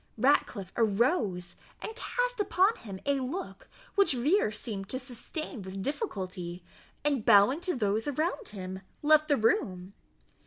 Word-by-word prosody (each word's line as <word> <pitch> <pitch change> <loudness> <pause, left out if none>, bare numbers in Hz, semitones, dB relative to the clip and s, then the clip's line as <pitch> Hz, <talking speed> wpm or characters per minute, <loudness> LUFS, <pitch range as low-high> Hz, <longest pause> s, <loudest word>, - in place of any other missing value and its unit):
Ratcliffe 230 -6 +2
arose, 215 - +1 0.2
and 440 - -6
cast - - -2
upon 400 +1 +3
him 195 -4 -8
a 280 -1 +2
look, 275 +9 -5 0.2
which 400 -7 +4
Vere 265 - +2
seemed 210 -2 -5
to 260 - -1
sustain 255 - -6
with 190 0 -6
difficulty, 185 - -4 0.4
and, 280 -6 +1
bowing 215 +7 +6
to 360 -2 -1
those 215 0 0
around 325 - -1
him, 190 -1 -6 0.2
left 310 +1 +5
the 285 - +3
room. 190 -4 0
240 Hz, 140 wpm, -30 LUFS, 195-310 Hz, 0.4 s, bowing